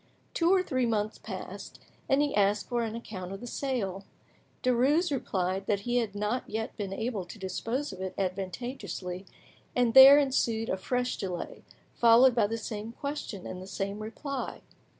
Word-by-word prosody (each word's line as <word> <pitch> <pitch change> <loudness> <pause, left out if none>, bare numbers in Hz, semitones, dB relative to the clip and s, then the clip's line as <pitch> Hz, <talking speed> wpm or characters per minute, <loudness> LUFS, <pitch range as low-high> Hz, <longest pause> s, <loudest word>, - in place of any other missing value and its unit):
Two 335 +1 +3
or 380 -1 +4
three 255 -7 0
months 215 -1 -1
passed, - - -8 0.3
and 275 +2 +4
he 290 - -1
asked 205 0 +2
for 240 -1 0
an 225 -1 -3
account 190 -6 -7
of 195 - -6
the 245 - -8
sale. 225 -7 -2 0.6
Derues 270 +8 +3
replied 190 -7 -1
that 200 -1 +1
he 240 +3 0
had 220 -4 -1
not 210 +5 -2
yet 220 +1 -3
been 200 -2 -4
able 220 0 -2
to 175 +5 -11
dispose 225 +7 -3
of 185 - -9
it 190 -1 -4
advantageously, 190 0 -4 0.5
and 245 -2 +2
there 270 +2 +11
ensued 235 -5 +1
a 190 - 0
fresh 250 +6 -1
delay, 180 -3 -5 0.3
followed 240 +2 +6
by 225 -3 +3
the 225 +2 -2
same 220 0 -5
question 280 -8 -5
and 185 - -6
the 185 - -9
same 200 +1 -3
reply. 255 +5 -5
225 Hz, 170 wpm, -29 LUFS, 195-255 Hz, 0.6 s, there